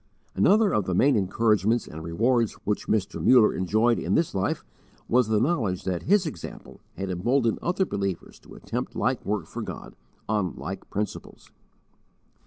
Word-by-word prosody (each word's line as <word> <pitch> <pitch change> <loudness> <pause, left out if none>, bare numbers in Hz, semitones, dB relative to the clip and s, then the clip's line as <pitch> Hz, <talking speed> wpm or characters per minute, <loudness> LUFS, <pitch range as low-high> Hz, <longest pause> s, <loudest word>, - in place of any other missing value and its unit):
Another 210 -1 +4
of 105 - +1
the 90 - -1
main 135 +7 +4
encouragements 105 +2 +2
and 80 +1 -9
rewards 115 +7 +1
which 105 0 -2
Mr. 105 -3 -1
Muller 125 -4 +6
enjoyed 110 +6 +2
in - - 0
this 165 - +1
life 95 0 -1 0.4
was 125 -1 +3
the 110 -1 +2
knowledge 115 - 0
that 90 -2 -2
his 200 +1 +3
example 120 - -8 0.2
had 95 0 -3
emboldened 115 +6 +1
other 180 +2 0
believers 100 - -4
to - - -15
attempt - - -5
like - - 0
work - - -2
for - - -7
God, - - -8 0.3
on 105 -6 -1
like 95 +7 -7
principles. 105 +1 -5
105 Hz, 160 wpm, -26 LUFS, 95-125 Hz, 0.4 s, Muller